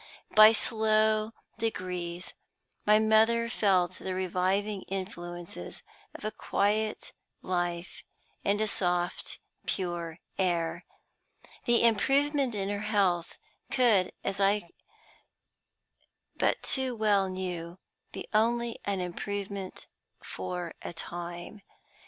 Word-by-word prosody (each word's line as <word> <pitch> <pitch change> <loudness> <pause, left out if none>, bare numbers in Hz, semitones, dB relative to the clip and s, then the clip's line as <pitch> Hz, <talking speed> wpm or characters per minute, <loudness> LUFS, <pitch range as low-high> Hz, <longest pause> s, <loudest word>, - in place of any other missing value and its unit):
By 215 0 +10
slow 215 -1 +2 0.3
degrees 180 -5 -3 0.5
my 210 0 +7
mother 220 +2 +4
felt 185 -5 +2
the 185 -1 -3
reviving 190 +2 0
influences 175 - -6 0.3
of - - -8
a 215 - -1
quiet 215 +1 0 0.3
life 175 0 -2 0.4
and 200 +1 +2
a 215 - +2
soft, 180 -2 -1 0.3
pure 175 -3 -2 0.2
air. 170 -2 0 0.8
The 240 -1 +4
improvement 270 +3 +3
in 195 -1 -1
her 205 0 -1
health 185 -5 +1 0.3
could, 220 -8 +4
as 195 0 -2
I 200 -2 +2 1.6
but - - +1
too 260 -2 0
well 205 -3 +3
knew, 180 -2 -4 0.3
be - - -7
only 235 +2 +2
an 200 -2 0
improvement 195 +2 -4 0.4
for 180 -2 -4
a - - -6
time. 175 +4 -7
195 Hz, 100 wpm, -30 LUFS, 175-215 Hz, 1.6 s, By